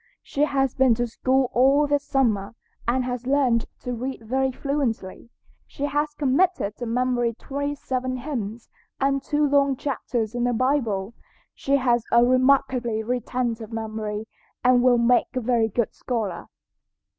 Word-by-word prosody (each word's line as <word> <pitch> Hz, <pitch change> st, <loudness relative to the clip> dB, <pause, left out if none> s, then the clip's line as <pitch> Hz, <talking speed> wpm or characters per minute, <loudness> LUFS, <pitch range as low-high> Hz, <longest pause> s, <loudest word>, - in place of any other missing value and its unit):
She 290 Hz, +1 st, 0 dB
has 270 Hz, -3 st, 0 dB
been 260 Hz, -3 st, +4 dB
to 240 Hz, +1 st, 0 dB
school 260 Hz, +2 st, 0 dB
all 275 Hz, +4 st, +4 dB
this 290 Hz, 0 st, 0 dB
summer, 230 Hz, -6 st, 0 dB, 0.3 s
and 255 Hz, +2 st, +2 dB
has 250 Hz, 0 st, -4 dB
learned 260 Hz, -4 st, +2 dB
to 250 Hz, -, -4 dB
read 250 Hz, 0 st, -5 dB
very 265 Hz, +4 st, 0 dB
fluently. 250 Hz, -7 st, -3 dB, 0.4 s
She 280 Hz, -, -4 dB
has 295 Hz, +1 st, -1 dB
committed 285 Hz, -, +1 dB
to 240 Hz, -, -5 dB
memory 240 Hz, -1 st, 0 dB
twenty 285 Hz, +3 st, -4 dB
seven 255 Hz, -2 st, -3 dB
hymns 240 Hz, -5 st, -5 dB, 0.3 s
and 275 Hz, 0 st, +1 dB
two 295 Hz, +1 st, +1 dB
long 280 Hz, -1 st, +3 dB
chapters 245 Hz, -5 st, -3 dB
in 245 Hz, 0 st, -1 dB
the 245 Hz, -, +1 dB
Bible. 230 Hz, -5 st, 0 dB, 0.4 s
She 275 Hz, -, 0 dB
has 240 Hz, -3 st, +2 dB
a 235 Hz, +1 st, +6 dB
remarkably 255 Hz, -3 st, +2 dB
retentive 240 Hz, -1 st, -2 dB
memory 220 Hz, -1 st, -4 dB, 0.4 s
and 250 Hz, 0 st, +5 dB
will 250 Hz, -1 st, +5 dB
make 240 Hz, +2 st, +2 dB
a -, -, +1 dB
very 235 Hz, -2 st, +1 dB
good 225 Hz, +1 st, -1 dB
scholar." 230 Hz, -6 st, -3 dB
250 Hz, 150 wpm, -24 LUFS, 230-275 Hz, 0.4 s, a